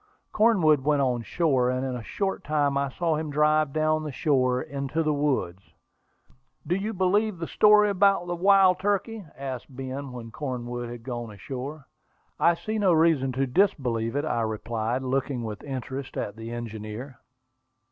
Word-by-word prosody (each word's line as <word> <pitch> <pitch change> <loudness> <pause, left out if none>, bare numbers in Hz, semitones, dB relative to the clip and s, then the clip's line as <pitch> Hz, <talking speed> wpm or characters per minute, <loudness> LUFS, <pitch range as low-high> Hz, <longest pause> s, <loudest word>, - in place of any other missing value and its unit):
Cornwood 185 - +4
went 145 -1 +2
on 125 -2 0
shore, 130 - +1
and 130 +1 -1
in 130 -1 -3
a 125 - -5
short 195 - -3
time 145 -2 +1
I 140 0 0
saw 165 +3 -1
him 155 0 -3
drive 150 0 +2
down 155 +1 +1
the 150 - -4
shore 130 -4 +1
into 140 +4 -3
the 155 -1 +1
woods. 135 -11 -1 1.0
"Do 175 - 0
you 200 +4 -1
believe 200 +1 +1
that 165 0 -5
story 210 0 +6
about 195 -2 +3
the 175 0 -3
wild 190 0 +5
turkey?" 205 +2 -1
asked 130 -3 -5
Ben, 135 +1 -6
when 120 -2 -8
Cornwood 120 -3 -4
had 120 -1 -8
gone 120 -2 -5
ashore. 130 - -7 0.5
"I 170 - +4
see 215 +5 -3
no 190 -4 +4
reason 160 -5 +3
to 135 +2 0
disbelieve 125 - +1
it," 145 +2 0
I 120 -6 0
replied, 110 +3 -2
looking 130 -1 -1
with 105 -2 -6
interest 135 0 -6
at 100 - -3
the 115 0 -8
engineer. 120 +2 -7
140 Hz, 165 wpm, -26 LUFS, 125-170 Hz, 1.0 s, story